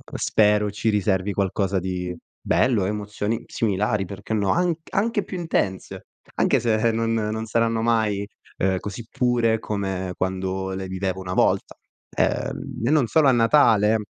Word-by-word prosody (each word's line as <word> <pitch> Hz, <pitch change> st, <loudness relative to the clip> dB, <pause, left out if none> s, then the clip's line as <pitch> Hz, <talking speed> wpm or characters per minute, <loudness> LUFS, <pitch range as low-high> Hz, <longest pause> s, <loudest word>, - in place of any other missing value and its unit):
spero 105 Hz, -1 st, +2 dB
ci 105 Hz, +2 st, -1 dB
riservi 100 Hz, -1 st, +1 dB
qualcosa 95 Hz, 0 st, 0 dB
di 90 Hz, -1 st, -4 dB, 0.3 s
bello, 115 Hz, -7 st, +2 dB
emozioni 105 Hz, +2 st, -3 dB
similari, 105 Hz, -2 st, 0 dB
perché 100 Hz, +3 st, -6 dB
no? 100 Hz, -3 st, +1 dB
Anc 175 Hz, -2 st, +1 dB
anche 210 Hz, +1 st, 0 dB
più 185 Hz, -, -6 dB
intense, 100 Hz, -, -2 dB, 0.3 s
anche -, -, +3 dB
se 115 Hz, 0 st, +2 dB
non 115 Hz, 0 st, 0 dB
non 110 Hz, 0 st, -2 dB
saranno 115 Hz, 0 st, +1 dB
mai, 110 Hz, -3 st, +1 dB, 0.3 s
ehm, 95 Hz, 0 st, +1 dB
così 105 Hz, +3 st, -7 dB
pure 120 Hz, -4 st, +1 dB
come 95 Hz, -4 st, -3 dB
quando 95 Hz, +1 st, -2 dB
le 95 Hz, 0 st, -4 dB
vivevo 95 Hz, 0 st, -3 dB
una 90 Hz, -1 st, -5 dB
volta. -, -, +1 dB, 0.4 s
Ehm, -, -, -2 dB
e -, -, +2 dB
non 150 Hz, -6 st, +3 dB
solo 155 Hz, +4 st, +3 dB
a 135 Hz, -, +6 dB
Natale, 115 Hz, -3 st, +4 dB
105 Hz, 150 wpm, -23 LUFS, 95-115 Hz, 0.4 s, a